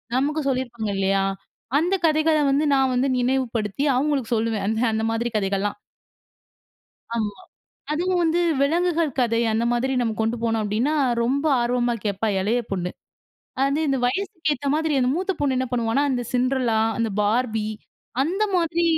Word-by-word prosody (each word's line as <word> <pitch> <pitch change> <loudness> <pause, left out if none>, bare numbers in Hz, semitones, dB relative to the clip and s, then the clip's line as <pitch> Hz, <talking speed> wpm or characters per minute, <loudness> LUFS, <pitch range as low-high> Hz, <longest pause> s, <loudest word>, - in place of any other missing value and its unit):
நமக்கு 295 +4 +1
சொல்லிருப்பாங்க 240 -5 -2
இல்லயா! 195 0 +2 0.6
அந்த 355 +5 +1
கதைகள 310 0 +3
வந்து 280 +2 +2
நான் 265 -1 +2
வந்து 250 +2 +1
நினைவுப்படுத்தி 245 -3 -1
அவுங்களுக்கு 270 -3 0
சொல்லுவேன். 220 -2 -1
அந்த, 220 0 0
அந்த 220 0 0
மாதிரி 230 +1 -1
கதைகள்லாம். 200 0 -1 1.4
ஆமா. 210 -3 -2 0.5
அதுவும் 355 +4 0
வந்து 330 +1 +2 0.2
விலங்குகள் 335 +1 +1
கதை 230 -2 +2
அந்த 225 - +1
மாதிரி 250 +2 0
நம்ம 225 -2 0
கொண்டு 225 +2 0
போனோம் 225 -1 +1
அப்பிடின்னா, 220 +8 0 0.3
ரொம்ப 275 +5 0 0.2
ஆர்வமா 240 0 +1
கேட்பா 205 +2 -1
இளைய 220 +5 +1
பொண்ணு. 180 -2 -2 0.7
அது 280 +3 +1
இந்த 270 -1 +1
வயதுக்கு 340 - -1
ஏத்த 280 +1 -4
மாதிரி 315 -1 0
அந்த 250 - +2
மூத்த 375 +4 -1
பொண்ணு 275 -3 +1
என்ன 260 - 0
பண்ணுவான்னா, 235 +3 +1
அந்த 250 -2 -1
சின்டர்லா 250 -3 +1 0.2
அந்த 230 -1 0
பார்பி 220 0 0 0.6
அந்த 365 +9 -1
மாதிரி 340 0 +1
250 Hz, 150 wpm, -23 LUFS, 225-300 Hz, 1.4 s, கதைகள